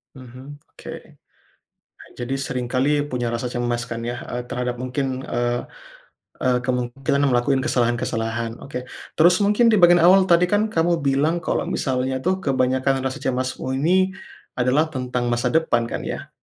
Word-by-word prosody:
Mhm, 130 +3 -11 0.2
oke, - - -9 1.3
jadi 120 +2 -3
sering 125 -1 -3
kali 145 +3 +2
punya 125 -1 -2
rasa 120 +1 -3
cemas 120 -1 -1
kan 115 - -3
ya, 120 - -3
eee, 125 0 -3
terhadap 125 0 -3
mungkin, 135 +2 -2 0.2
eee 120 0 -1 0.8
eee, 125 -1 +2
kemungkinan 125 +2 -1
ngelakuin 130 +1 +2
kesalahan-kesalahan. 115 -2 -1
Oke, 125 -2 -6 0.3
terus 175 +3 +6
mungkin 210 +4 +3
di - - +4
bagian 175 0 +7
awal 190 +2 +7
tadi 170 +1 +6
kan 210 +3 +1
kamu 170 -2 +2
bilang 140 +4 +2
kalau - - 0
misalnya 130 -1 -1
tuh 185 +1 +1
kebanyakan 130 0 +1
rasa 130 +2 -3
cemasmu 130 0 -2
ini 185 +5 +2 0.4
adalah 135 +6 +2
tentang 125 -2 -2
masa 120 0 0
depan 160 -7 +2
kan - - -2
ya? - - -6
130 Hz, 150 wpm, -22 LUFS, 125-150 Hz, 1.3 s, bagian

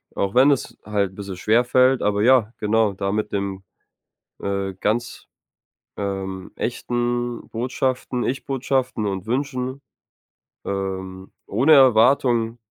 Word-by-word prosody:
auch 100 +2 -1
wenn 135 +3 +6
es 140 - -2
halt 100 -3 -1
'n - - -18
bisschen 100 -2 -7
schwer 110 +6 +3
fällt 130 +1 +3
aber 105 0 +1
ja, 120 -2 +4
genau, 110 0 +2
da 100 0 -2
mit 105 +1 -2
den, 100 -1 -3 0.8
äh, 100 -1 -2
ganz, 115 +4 -2 0.7
ähm, 95 -2 -4
echten 120 0 -2
Botschaften 125 +1 -2
Ich-Botschaften 130 -3 -1
und 95 -2 -4
Wünschen, 130 +2 -2 0.8
ähm, 95 -1 -5 0.2
ohne 130 +10 +3
Erwartung 120 -2 +4
115 Hz, 120 wpm, -22 LUFS, 100-125 Hz, 0.8 s, wenn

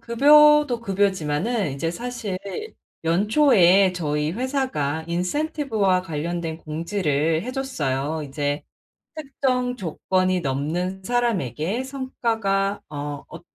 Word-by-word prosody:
급여도 295 +1 +5
급여지만은 195 - 0
이제 150 +5 -2
사실 235 0 -4 0.7
연초에 195 - +4
저희 150 -3 -1
회사가 235 - -2
인센티브와 200 - 0
관련된 165 0 -4
공지를 160 -1 -1
해 250 - -4
줬어요. 155 - -2
이제 145 +1 -2 0.5
"특정 260 -4 -1
조건이 185 0 0
넘는 165 +8 -2
사람에게 220 - -1
성과가 225 -7 -1
어 145 -1 -5
어 - - -10
190 Hz, 235 characters per minute, -23 LUFS, 160-245 Hz, 0.7 s, 급여도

